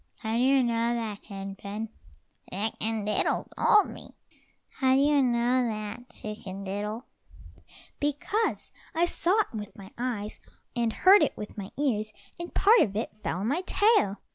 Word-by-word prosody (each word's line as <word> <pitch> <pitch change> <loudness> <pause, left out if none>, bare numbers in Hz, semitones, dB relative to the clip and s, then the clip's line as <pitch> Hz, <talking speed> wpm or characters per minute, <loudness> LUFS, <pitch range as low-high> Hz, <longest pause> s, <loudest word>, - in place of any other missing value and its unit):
"How 220 -1 -4
do 235 - +2
you 265 +1 +4
know 235 0 +1
that, 220 -3 -4
Hen 195 -1 -7
pen?" 210 +3 -5 0.6
"Chicken 215 +2 -2
diddle 210 - 0
told 420 -2 +5
me." - - -11 0.6
"How 260 -1 +4
do - - +4
you 290 0 +4
know 245 0 +2
that, 215 +2 -5
Chicken 200 -2 -7
diddle?" 210 +5 -4 0.9
"Because 295 +10 -1 0.2
I 335 +2 +4
saw 360 +4 +1
it 415 - -6
with 210 -2 -6
my 195 0 -11
eyes, 225 -4 -3 0.4
and 235 -2 +1
heard 385 - +6
it - - +1
with 210 - -7
my 200 -2 -6
ears, 215 -7 0 0.3
and 345 0 -6
part 440 +4 +5
of 200 - +2
it 220 - -2
fell 185 - -2
on 210 - -1
my 290 +8 +1
tail. 410 - +3
230 Hz, 165 wpm, -28 LUFS, 210-275 Hz, 0.9 s, heard